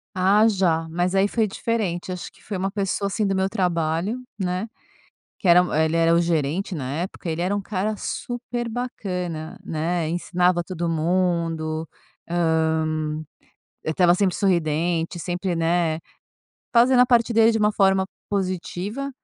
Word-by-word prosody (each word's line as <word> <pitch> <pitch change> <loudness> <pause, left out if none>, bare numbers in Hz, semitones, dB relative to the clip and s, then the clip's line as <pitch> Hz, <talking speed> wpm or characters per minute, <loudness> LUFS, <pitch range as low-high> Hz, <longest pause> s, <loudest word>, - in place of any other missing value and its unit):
Ah 200 +4 +4
já. 170 -6 +1
Mas 175 +3 0
aí 195 +1 +4
foi 220 0 +1
diferente, 190 -5 -2
acho 180 - -6
que - - -23
foi 205 - -5
uma 195 +1 -1
pessoa, 200 0 -1
assim, 210 +1 -1
do 195 -1 +1
meu 190 0 +1
trabalho, 180 +3 -1 0.2
né, 185 +3 -1 0.7
que 185 - 0
era 175 +1 +8 0.2
ele 160 +1 0
era 165 0 +4
o 170 - +4
gerente 170 +3 0
na 135 -3 -4
época, 180 -1 -5
ele 165 +2 -1
era 190 +3 0
um 205 - -1
cara 205 +2 -2
super 240 +1 -4
bacana, 180 -9 -4
né, 165 +1 -1
ensinava 175 +1 +1
todo 170 -1 -3
mundo, 165 -2 0 0.4
hã, 160 -2 +1 0.8
eh, 160 - -1
estava 175 +1 +4
sempre 190 -2 +1
sorridente 170 -2 0
sempre, 180 +1 -2
né, 165 -1 +1 0.7
fazendo 245 +2 +5
a 250 - +7
parte 240 -1 +3
dele 225 0 +5
de 225 - 0
uma 210 0 +3
forma 195 -2 +3 0.2
positiva. 195 +6 -3
180 Hz, 155 wpm, -23 LUFS, 165-200 Hz, 0.8 s, era